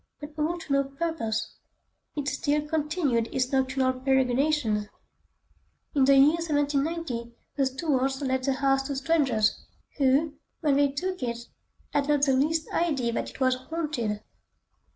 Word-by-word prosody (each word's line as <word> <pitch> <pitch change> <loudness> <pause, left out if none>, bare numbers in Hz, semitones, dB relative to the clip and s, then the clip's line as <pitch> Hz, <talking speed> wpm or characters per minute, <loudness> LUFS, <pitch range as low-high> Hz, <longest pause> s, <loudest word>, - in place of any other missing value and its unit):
But 295 0 -8
all 325 +3 0
to 320 -4 -4
no 275 0 +3
purpose; 275 -6 -3 0.6
it 290 -2 -3
still 295 +1 0
continued 300 -6 0
its 255 0 -1
nocturnal 260 -1 +1
peregrinations. 260 -3 +1 1.1
In 275 -2 +4
the 275 +1 +6
year 295 +5 +6
1790 290 -5 -1 0.2
the 275 - +2
Stuarts 265 -1 0
let 260 -2 0
the 270 +1 +1
house 270 0 +2
to 280 - -3
strangers, 265 -7 +1 0.4
who, 280 +3 +3 0.3
when 285 -3 +3
they 285 0 +4
took 365 +5 -3
it, 235 -2 -2 0.6
had 285 -1 +1
not 290 -1 +3
the 275 -2 +4
least 310 +4 +1
idea 280 -9 0
that - - -2
it - - -14
was 260 -1 +3
haunted. 255 -6 -3
275 Hz, 145 wpm, -27 LUFS, 260-300 Hz, 1.1 s, the